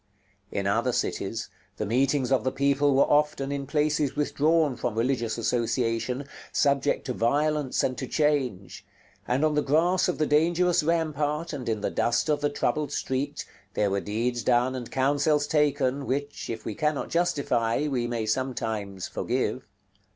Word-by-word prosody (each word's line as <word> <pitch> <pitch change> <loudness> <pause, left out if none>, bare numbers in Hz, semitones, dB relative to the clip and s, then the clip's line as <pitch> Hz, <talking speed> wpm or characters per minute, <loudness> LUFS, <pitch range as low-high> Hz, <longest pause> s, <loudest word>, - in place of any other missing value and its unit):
In - - -2
other - - +1
cities, 110 +3 -2 0.3
the 110 - -2
meetings 130 +4 +1
of 135 - +3
the 130 - 0
people 140 +1 +2
were 135 - +6
often 145 -2 +1
in 140 -1 -3
places 150 -1 +1
withdrawn 150 0 +2
from 110 - -3
religious 120 -2 0
association, 120 +2 -1 0.3
subject 140 0 +1
to 125 - -2
violence 145 +4 +1
and 130 - 0
to 130 - -4
change; 135 - -1 0.4
and 130 +5 +2
on 155 - +2
the 150 - +2
grass 165 +6 +2
of 180 - -1
the 155 - +1
dangerous 170 +4 +3
rampart, 155 0 -1
and 130 -5 -4
in 110 -2 -1
the - - -1
dust 120 +5 +1
of 150 -1 +1
the 145 - +2
troubled 150 +1 -1
street, 140 +2 -2 0.3
there 105 -2 +1
were 100 0 0
deeds 120 +6 -1
done 125 +2 +2
and 125 -2 -6
counsels 145 +2 +2
taken, 145 -3 +1
which, 145 +2 -3
if 115 -1 -5
we - - -3
cannot 150 -2 -1
justify, 140 -7 +1
we 125 -4 -1
may 115 -2 -2
sometimes 110 -5 -2
forgive. - - -2
140 Hz, 160 wpm, -26 LUFS, 120-150 Hz, 0.4 s, were